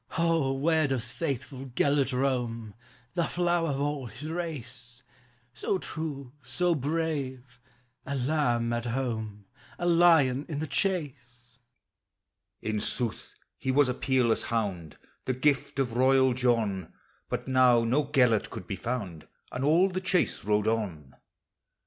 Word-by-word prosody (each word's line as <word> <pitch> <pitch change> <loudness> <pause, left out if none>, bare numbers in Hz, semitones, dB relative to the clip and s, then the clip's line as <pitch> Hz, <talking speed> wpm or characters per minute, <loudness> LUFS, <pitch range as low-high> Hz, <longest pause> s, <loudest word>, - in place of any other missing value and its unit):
"O, 165 -5 +2
where 155 +2 +2
does 125 -4 -2
faithful 135 -3 -4
Gelert 140 +2 +1
roam, 120 -4 -1 0.4
The 170 - +1
flower 175 -2 +1
of 140 -1 -1
all 145 -2 -2
his 125 +8 -8
race; 125 -8 -6 0.5
So 190 - -1
true, 145 -7 -5
so 180 +2 0
brave, 140 -5 -3 0.2
— 125 0 -43
a 140 - -2
lamb 125 -4 +1
at 120 0 -2
home 110 -5 -3 0.3
A 175 - -3
lion 165 -6 +4
in 150 - -3
the 155 - -2
chase? 125 - -3 0.5
" - - -57
In 110 -1 -1
sooth, 120 +1 -3 0.2
he 130 - -3
was 140 +1 +4
a - - +1
peerless 125 -3 +2
hound, 95 -9 -3 0.3
The 130 - 0
gift 140 +1 +1
of 125 -4 -1
royal 130 0 +4
John; 115 -8 0 0.4
But - - -3
now 125 -2 +5
no 130 +6 +2
Gelert 125 -6 +3
could 95 - -7
be 95 - -4
found, 100 -9 -4 0.2
And 125 - -3
all 165 +6 +5
the 185 -1 -3
chase 185 -1 +1
rode 105 +1 +1
on. 95 -12 -2
130 Hz, 145 wpm, -28 LUFS, 120-150 Hz, 0.5 s, now